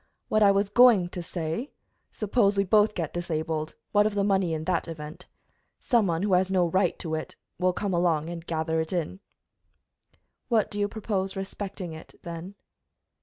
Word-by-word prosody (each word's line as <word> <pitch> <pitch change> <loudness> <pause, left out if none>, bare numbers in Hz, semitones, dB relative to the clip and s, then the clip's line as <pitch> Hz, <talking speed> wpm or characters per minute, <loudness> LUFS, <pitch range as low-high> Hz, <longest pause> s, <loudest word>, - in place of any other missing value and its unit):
What 215 - +2
I 205 - +7
was 200 0 +2
going 220 -6 +6
to 180 - -6
say 170 - -4 0.4
suppose 210 -1 +1
we 200 - +4
both 210 +2 +3
get 165 -4 -3
disabled, 160 -2 -3 0.2
what 205 0 +4
of 210 - -4
the 200 - +2
money 195 -3 +2
in 155 -1 -2
that 175 +1 0
event? 155 -2 -8 0.5
Some 235 -5 +2
one 165 +1 0
who 205 -2 +1
has 185 +1 +3
no 185 -2 +3
right 180 +1 +1
to 160 -2 -5
it 155 - -4 0.2
will 185 0 +3
come 195 +1 -2
along 170 -3 +1
and 170 -1 -6
gather 160 -1 -1
it 160 - -5
in." 175 +1 -2 1.3
"What 225 -4 +2
do 205 - -4
you 205 - +2
propose 200 -3 -3
respecting 195 -2 -5
it, 160 - -12
then?" 170 +2 -7
185 Hz, 180 wpm, -27 LUFS, 165-205 Hz, 1.3 s, I